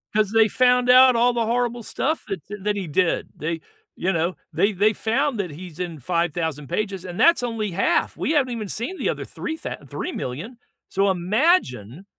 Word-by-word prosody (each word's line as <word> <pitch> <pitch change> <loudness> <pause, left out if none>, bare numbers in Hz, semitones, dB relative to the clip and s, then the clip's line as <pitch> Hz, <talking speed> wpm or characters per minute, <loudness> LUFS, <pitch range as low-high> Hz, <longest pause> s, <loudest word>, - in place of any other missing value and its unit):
'Cause 215 -1 +2
they 225 -1 +5
found 250 +1 +3
out 255 0 +8
all 240 +1 +3
the 230 -2 0
horrible 240 0 -1
stuff 310 +9 -2
that 195 -6 -4 0.2
that 210 0 0
he 190 -4 -4
did, 170 +3 0
they, 165 +2 -3 0.4
you 190 +2 0
know 170 +2 0 0.2
they 205 - +2
they 210 +3 +2
found 255 +4 0
that 180 -5 -2
he's 170 +2 -10
in 170 -4 -4
5,000 160 -1 -2
pages, 195 -4 -2
and 180 -1 -7
that's 335 -7 +5
only 220 -4 -2
1/2. 190 - +1
We - - -1
haven't 270 -6 +2
even 215 -4 -5
seen 240 - -4
the - - -1
other - - -3
3 320 -1 -5
thou - - -5
3,000,000. 215 - -5 0.3
So 195 +1 +2
imagine 185 - +1
210 Hz, 185 wpm, -23 LUFS, 175-245 Hz, 0.4 s, out